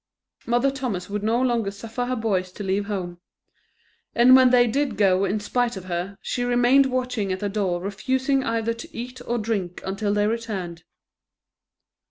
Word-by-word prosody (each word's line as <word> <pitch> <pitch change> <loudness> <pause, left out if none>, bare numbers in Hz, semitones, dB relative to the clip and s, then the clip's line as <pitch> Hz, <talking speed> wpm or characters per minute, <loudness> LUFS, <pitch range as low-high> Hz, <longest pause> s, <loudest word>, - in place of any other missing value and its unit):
Mother 240 +3 +2
Thomas 240 -9 -4
would 210 0 -2
no 225 +3 +1
longer 240 -5 +1
suffer 225 +5 -5
her 255 +1 -1
boys 195 -6 -1
to 205 - -7
leave 195 +1 0
home; 180 -4 -4 1.0
and 250 +2 +7
when 260 -1 +7
they 245 -1 +5
did 275 +5 -1
go 195 -1 +3
in 200 +3 -1
spite 240 +2 -1
of 185 - -8
her, 180 +2 -4
she 245 - -2
remained 245 +3 +4
watching 250 -6 -2
at 185 - -2
the 205 - -2
door 195 -4 -1
refusing 260 +8 0
either 230 -1 -1
to 230 - -10
eat 250 +2 -6
or 240 - 0
drink 205 -6 -2
until 200 +2 -1
they 205 0 +2
returned. 200 -7 -3
220 Hz, 175 wpm, -24 LUFS, 195-245 Hz, 1.0 s, and